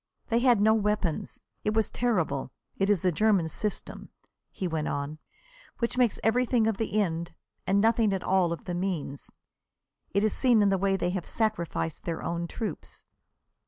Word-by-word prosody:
They 230 0 +3
had 240 -3 +4
no 220 +2 +5
weapons. 210 -6 -1 0.2
It 210 +1 0
was 220 -1 +1
terrible. 180 - 0 0.2
It 195 +1 0
is 200 -5 +2
the 180 - +3
German 200 -1 +3
system," 210 +6 -4 0.4
he 185 - -4
went 160 -3 -2
on, 145 +2 -3 0.6
"which 235 0 -1
makes 245 -4 +2
everything 240 0 +2
of 220 -2 +1
the 215 -1 0
end, 170 -3 -2 0.3
and 195 +1 +3
nothing 225 0 +3
at 190 -2 -2
all 185 -3 +2
of 170 - -5
the 180 - -3
means. 175 -6 -3 0.8
It 200 +2 +1
is 215 - +2
seen 240 -5 +4
in 200 - +4
the 195 -1 +1
way 195 0 +2
they 180 -1 -1
have 180 -2 -4
sacrificed 175 -7 -2
their 165 -2 -3
own 170 0 -2
troops." 210 -1 -6
195 Hz, 175 wpm, -28 LUFS, 170-220 Hz, 0.8 s, no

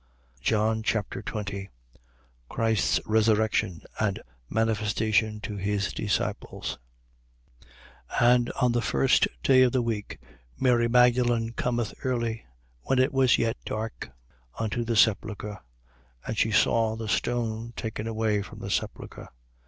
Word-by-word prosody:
John 110 0 +1
Chapter 110 -2 -2
20 100 -2 -5 0.8
Christ's 115 -2 +1
resurrection 110 -5 +1 0.2
and 100 -3 0 0.3
manifestation 110 0 +1
to 105 -1 -5
his 100 0 -1
disciples. - - -3 1.3
20:1. 120 0 +4
And 120 -1 0
on 125 -2 +3
the 120 0 +1
first 65 -10 +3 0.2
day 130 -1 +6
of 125 -2 +4
the 130 -2 +2
week, 110 -3 -3 0.4
Mary 120 -2 +3
Magdalen 120 -1 +3
cometh 120 -2 -1
early, 115 - -2 0.3
when 135 - 0
it 130 +3 +3
was 130 -2 +4
yet 115 -1 0
dark, 110 - -5 0.5
unto 115 +2 -1
the 115 0 -1
sepulchre: 105 -1 +1 0.7
and 110 - -3
she 110 - +2
saw 110 +2 +2
the 110 -1 -5
stone 115 0 -1
taken 110 -1 -4
away 110 -2 0
from 100 - -10
the - - -6
sepulchre. - - -4
110 Hz, 125 wpm, -27 LUFS, 105-120 Hz, 1.3 s, day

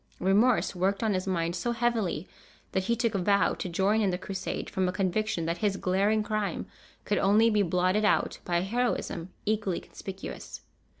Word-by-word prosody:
Remorse 210 +6 +3
worked 195 +4 0
on 220 -2 +2
his 185 0 -2
mind 170 -2 0
so 235 +7 -1
heavily 230 -8 0 0.4
that 190 0 0
he 235 +3 +2
took 230 -2 0
a 195 - 0
vow 200 0 +3
to 185 - -4
join 195 +5 +2
in 200 - +2
the 180 - -1
Crusade, 190 0 -4
from 185 -1 0
a - - 0
conviction 190 0 -1
that 170 +1 -2
his 200 -2 +1
glaring 200 +4 +2
crime 210 -4 -2 0.4
could 205 - +1
only 215 +4 +4
be 210 -1 +3
blotted 185 +3 +2
out 210 - +2
by 175 -1 0
a - - +1
heroism 200 -5 -1 0.2
equally 210 -4 0
conspicuous. 195 0 -8
195 Hz, 185 wpm, -28 LUFS, 185-215 Hz, 0.4 s, only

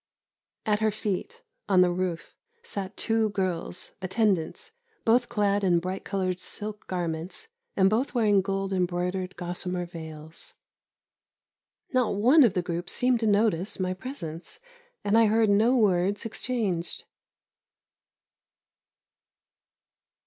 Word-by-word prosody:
At 210 -1 +2
her 220 0 +2
feet, 215 - -4 0.3
on 185 -2 +6
the 180 -1 +4
roof, 175 -2 -3 0.3
sat 195 - -5
two 225 -1 +1
girls, 185 -3 -2
attendants, 190 - 0 0.3
both 240 +1 +3
clad 205 -1 +1
in 180 -3 +4
bright 185 +3 -3
coloured 185 -2 -2
silk 210 +2 -5
garments, 175 - -4 0.3
and 190 -1 +5
both 235 +7 0
wearing 210 -4 +4
gold 195 0 -2
embroidered 180 0 -1
gossamer 180 0 -3
veils. 160 -2 -10 1.4
Not 250 -5 +2
one 250 +10 +6
of 215 -5 +3
the 180 - +1
group 175 0 -3
seemed 250 -1 +2
to 225 - 0
notice 205 -3 +2
my 185 0 0
presence, 185 - -7 0.4
and 205 +1 +2
I 225 -1 +6
heard 220 0 +3
no 225 +6 +4
words 200 -1 +2
exchanged. 215 -7 -2
195 Hz, 120 wpm, -27 LUFS, 180-220 Hz, 1.4 s, on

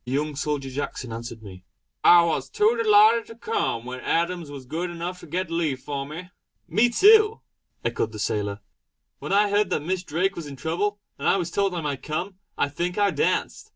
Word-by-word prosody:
The 125 - -5
young 150 +1 -1
soldier 145 -2 -2
Jackson 130 -3 -4
answered 115 -1 -7
me: 95 -3 -11 0.4
"I 175 -1 +8
was 140 -5 -1
too 215 - +3
delighted 220 0 +5
to 230 - -11
come, 235 - -2
when 130 +1 -6
Adams 170 +1 -1
was 140 -2 -9
good 165 +7 -3
enough 175 +1 -5
to 170 - -12
get 175 +2 -3
leave 160 -6 -1
for 140 0 -5
me." 180 +5 -8 0.4
"Me 235 +3 +3
too!" 425 - +5 0.4
echoed 110 - -1
the 110 - -8
sailor 105 0 -2 0.6
"When - - -6
I 205 +1 +3
heard 205 -1 +2
that 150 - -1
Miss 185 +1 -1
Drake 180 +4 -1
was 165 -3 -6
in 140 - -8
trouble, 180 +9 -1 0.2
and - - -2
I - - +4
was 175 -2 -3
told 195 -1 0
I 170 - -2
might 145 -3 -3
come, 180 +5 -4 0.2
I - - +2
think 175 +5 -3
I 205 -1 +3
danced. 150 - -1
170 Hz, 205 wpm, -25 LUFS, 140-195 Hz, 0.6 s, I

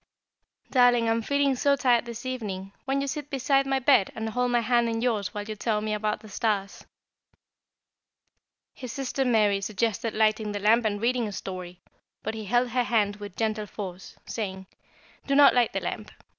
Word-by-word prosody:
"Darling, 245 -3 +4
I - - +3
am 230 0 +1
feeling 280 +2 +1
so 280 +2 +3
tired 245 -4 +2
this 235 +1 -8
evening, 200 -7 -4 0.2
won't 275 +1 +1
you 280 - -2
sit 295 0 -4
beside 275 0 +1
my 270 0 +1
bed 265 -6 +3
and 220 0 -3
hold 250 +3 0
my 240 -1 +2
hand 235 0 +2
in 225 0 -2
yours 225 -5 0
while 210 -2 -5
you 215 +1 -6
tell 215 0 0
me 215 0 -2
about 210 0 -1
the 220 - -12
stars?" 200 -1 -2 1.9
His 255 -3 -8
sister 270 0 -2
Mary 210 -5 +2
suggested 220 +2 -2
lighting 215 -1 +1
the 205 - -3
lamp 220 +3 +3
and 205 -1 0
reading 240 +1 +1
a - - -5
story, 180 -2 -7 0.4
but - - -3
he 220 -1 -6
held 240 +4 +2
her 245 0 0
hand 210 -4 +1
with 205 -2 -9
gentle 215 -1 -1
force, 190 -2 -8
saying: 190 -4 -5 0.6
"Do 275 - +1
not 285 -1 +7
light 245 -2 +3
the - - -2
lamp. - - -5
225 Hz, 190 wpm, -26 LUFS, 210-250 Hz, 1.9 s, not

